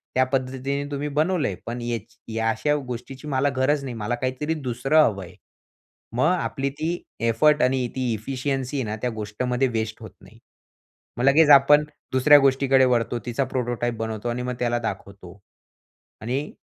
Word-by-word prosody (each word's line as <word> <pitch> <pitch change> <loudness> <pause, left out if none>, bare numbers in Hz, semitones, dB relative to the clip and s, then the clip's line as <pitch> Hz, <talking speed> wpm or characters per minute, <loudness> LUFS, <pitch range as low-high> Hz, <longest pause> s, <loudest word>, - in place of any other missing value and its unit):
त्या 130 - +4
पद्धतीने 135 +1 -2
तुम्ही 145 +1 -3
बनवलंय. 150 - 0
पण 120 +1 -4
याची 115 -1 -6
या 115 0 +1
अशा 145 +7 +1
गोष्टीची 130 +4 -7
मला 140 0 +1
गरज 140 +2 +1
नाही, 130 -3 -5
मला 115 +2 -2
काहीतरी 130 +5 -2
दुसरं 135 +1 0
हवं 100 -8 0
आहे. 90 +1 -13 0.8
मग 125 - +2
आपली 140 -6 -1
ती 160 +5 -3 0.3
एफर्ट 150 +7 +3
आणि 125 -1 +1
ती 125 -3 -1
एफिशियंसी 135 +4 -3
आहे 130 - 0
ना 105 - -2
त्या 125 - 0
गोष्टमध्ये 125 +5 -1
वेस्ट 110 -2 -3
होत - - -9
नाही. - - -17 0.8
मग 120 - -2
लगेच 150 +3 +5
आपण 145 +2 +5 0.3
दुसऱ्या 145 +3 +7
गोष्टीकडे 135 -1 +4
वळतो. 120 -1 +1
तिचा 125 +3 -1
प्रोटोटाइप 120 -2 -2
बनवतो 110 +1 -4
आणि 120 +1 -2
मग 125 - -3
त्याला 120 -1 0
दाखवतो 100 -3 -7 0.8
आणि 130 +6 -3
130 Hz, 160 wpm, -24 LUFS, 115-140 Hz, 0.8 s, दुसऱ्या